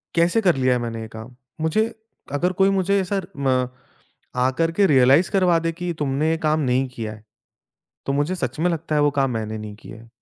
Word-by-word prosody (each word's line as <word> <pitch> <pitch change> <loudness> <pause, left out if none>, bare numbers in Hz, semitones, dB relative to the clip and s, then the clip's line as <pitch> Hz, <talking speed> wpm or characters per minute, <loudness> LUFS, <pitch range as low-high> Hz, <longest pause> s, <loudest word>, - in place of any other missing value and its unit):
कैसे 170 +6 +3
कर 180 -7 +3
लिया 130 -1 +2
है 125 - 0
मैंने 115 -1 -4
ये 110 - -6
काम? 110 +3 -11 0.3
मुझे 160 +7 +2 0.5
अगर 175 +6 +1
कोई 195 - +6
मुझे 200 +2 +2
ए - - 0
सर 195 +1 -3
म 130 -2 +1 0.8
आकर 130 +6 +1
के 200 -1 +5
रियलाइज़ 135 +3 +5
करवा 185 -4 +3
दे 165 - +1
कि 175 +1 -4
तुमने 145 +2 0
ये 165 - +1
काम 155 +1 +2
नहीं 130 -1 +1
किया 110 -3 -5
है, 105 - -13 0.8
तो 135 - 0
मुझे 145 +6 0
सच 130 -7 -4
में 180 +2 +2
लगता 165 -2 -3
है 150 - +3
वो 145 - +4
काम 135 -1 +2
मैंने 110 -1 -3
नहीं 105 -1 -7
किया 110 - -12
है। 115 - -17
145 Hz, 225 wpm, -22 LUFS, 125-175 Hz, 0.8 s, कोई